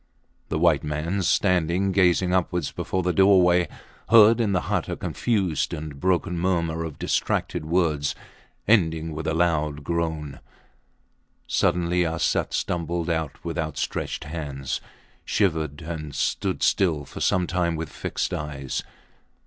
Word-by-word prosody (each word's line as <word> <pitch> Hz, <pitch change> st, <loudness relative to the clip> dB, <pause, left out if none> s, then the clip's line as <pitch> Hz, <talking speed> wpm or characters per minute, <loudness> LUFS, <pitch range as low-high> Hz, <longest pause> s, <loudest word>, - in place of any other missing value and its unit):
The -, -, -1 dB
white -, -, +3 dB
man, 75 Hz, +6 st, -2 dB
standing 90 Hz, +1 st, +2 dB
gazing 90 Hz, -1 st, +3 dB
upwards 90 Hz, -4 st, 0 dB
before 95 Hz, 0 st, -2 dB
the 90 Hz, 0 st, +1 dB
doorway, 90 Hz, -2 st, +5 dB, 0.4 s
heard 115 Hz, +1 st, +7 dB
in 105 Hz, -3 st, +1 dB
the 90 Hz, -3 st, +1 dB
hut -, -, -2 dB
a -, -, -2 dB
confused 100 Hz, -9 st, -1 dB
and 75 Hz, -2 st, -7 dB
broken 90 Hz, -1 st, 0 dB
murmur 85 Hz, -2 st, 0 dB
of 80 Hz, -3 st, -6 dB
distracted -, -, -1 dB
words 80 Hz, -4 st, +1 dB, 0.5 s
ending 80 Hz, -7 st, +2 dB
with 80 Hz, +1 st, -5 dB
a 80 Hz, -, 0 dB
loud 75 Hz, -4 st, 0 dB
groan. 80 Hz, -3 st, -2 dB, 1.1 s
Suddenly 90 Hz, -1 st, +1 dB
Arsat 80 Hz, 0 st, 0 dB
stumbled 85 Hz, 0 st, -1 dB
out 80 Hz, -3 st, -3 dB
with 85 Hz, 0 st, -3 dB
outstretched 75 Hz, -3 st, -3 dB
hands, 75 Hz, -4 st, -4 dB, 0.4 s
shivered, 80 Hz, -6 st, 0 dB
and 75 Hz, -3 st, -6 dB
stood -, -, -1 dB
still 80 Hz, -7 st, +2 dB
for -, -, -9 dB
some 90 Hz, -1 st, +2 dB
time 90 Hz, -2 st, 0 dB
with 80 Hz, -1 st, -4 dB
fixed -, -, -3 dB
eyes. 70 Hz, -3 st, -3 dB
85 Hz, 135 wpm, -25 LUFS, 75-90 Hz, 1.1 s, heard